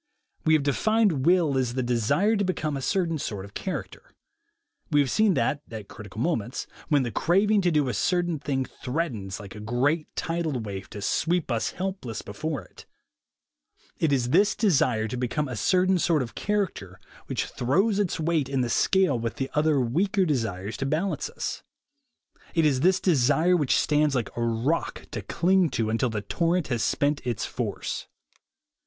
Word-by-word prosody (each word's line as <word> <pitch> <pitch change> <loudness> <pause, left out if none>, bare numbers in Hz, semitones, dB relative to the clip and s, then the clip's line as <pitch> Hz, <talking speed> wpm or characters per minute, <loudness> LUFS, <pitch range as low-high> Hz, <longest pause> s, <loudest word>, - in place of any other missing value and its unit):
We 160 - +5
have 150 - +2
defined 175 0 +2
will 170 -7 +4
as 125 -2 -1
the 130 - 0
desire 130 - +2
to 200 - +1
become 155 -6 -1
a 135 - -3
certain 165 0 0
sort 105 -9 -4
of 100 - -14
character. - - -6 0.7
We 150 - +3
have 140 -3 +2
seen 215 -4 +3
that, 145 - 0
at 110 -3 -8
critical 105 -1 -10
moments, 120 -4 -1 0.2
when 145 -4 +3
the 120 - -3
craving 200 - +3
to 180 - +2
do 150 -3 +2
a 125 - -1
certain 175 - 0
thing 135 -2 -1
threatens, 125 - -4
like 100 -1 -9
a 105 - -9
great 130 +9 0
tidal 165 -5 -2
wave, 100 -3 -6
to 105 - -7
sweep 170 - 0
us 115 -1 -1
helpless 185 - -4
before 150 +6 -4
it, - - -16 1.1
it 160 - +2
is 125 -3 +1
this 200 +6 +4
desire 130 - +2
to 125 - -4
become 130 +4 -1
a 125 - -5
certain 185 - +2
sort 160 -5 +2
of 115 - -8
character 185 - -2 0.3
which - - -1
throws 195 - +1
its 195 -5 0
weight 160 -4 0
in 135 -2 0
the 120 -1 -1
scale 190 -10 +3
with 115 0 -3
the 135 0 -3
other 150 -1 +3
weaker 185 - +1
desires 110 - -2
to 135 - -2
balance 165 +7 -1
us; - - -4 0.9
it 165 -2 +3
is 140 -4 +3
this 185 +5 +3
desire 160 +2 +3
which 150 -6 +2
stands 150 -1 +2
like 120 -5 -2
a 120 - -3
rock 115 +8 -1
to - - -4
cling 185 -1 +2
to 110 -4 -1
until 115 +3 +1
the 110 -2 -3
torrent 170 - 0
has 120 -3 0
spent 145 0 +1
its 120 -4 -2
force. - - -4
145 Hz, 180 wpm, -26 LUFS, 120-175 Hz, 1.1 s, We